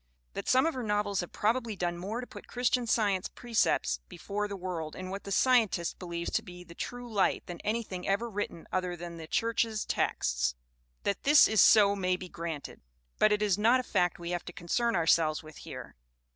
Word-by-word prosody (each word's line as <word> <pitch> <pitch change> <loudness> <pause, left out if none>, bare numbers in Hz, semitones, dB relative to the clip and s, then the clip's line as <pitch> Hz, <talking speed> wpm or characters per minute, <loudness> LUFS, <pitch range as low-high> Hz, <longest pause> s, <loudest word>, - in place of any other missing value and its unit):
That - - -4
some 260 +2 +5
of 325 - +1
her 255 - -4
novels 210 -3 0
have 175 - -3
probably 230 0 0
done 175 -2 -1
more 200 +7 -4
to - - -6
put - - -12
Christian 245 0 0
Science 205 -5 +1
precepts 220 - 0
before 210 +1 -3
the 200 -1 -5
world 175 -4 -4
in 185 0 -6
what 195 +1 -6
the 200 - -6
Scientist 220 -8 +2
believes 170 -2 -4
to - - +1
be 180 0 -11
the 170 -1 -13
true 245 +6 -6
light 200 -2 +1
than 175 -1 -7
anything 210 -5 -3
ever 200 +5 +1
written 205 -6 -4
other 180 -1 -1
than 170 0 -7
the 160 -1 -8
church's 225 +1 0
texts - - 0 0.5
that 200 - -1
this 290 +1 +7
is 220 -4 +4
so 205 -2 +6
may 185 -2 +1
be 185 0 -8
granted. 165 -4 -6 0.4
But 215 - +5
it 210 0 +2
is 205 -2 +2
not 235 +4 +5
a - - -2
fact 180 -6 +1
we 170 0 -5
have 175 -1 -2
to - - -6
concern 230 +7 0
ourselves 160 -2 +3
with 155 0 -12
here. - - -9
195 Hz, 205 wpm, -30 LUFS, 175-225 Hz, 0.5 s, this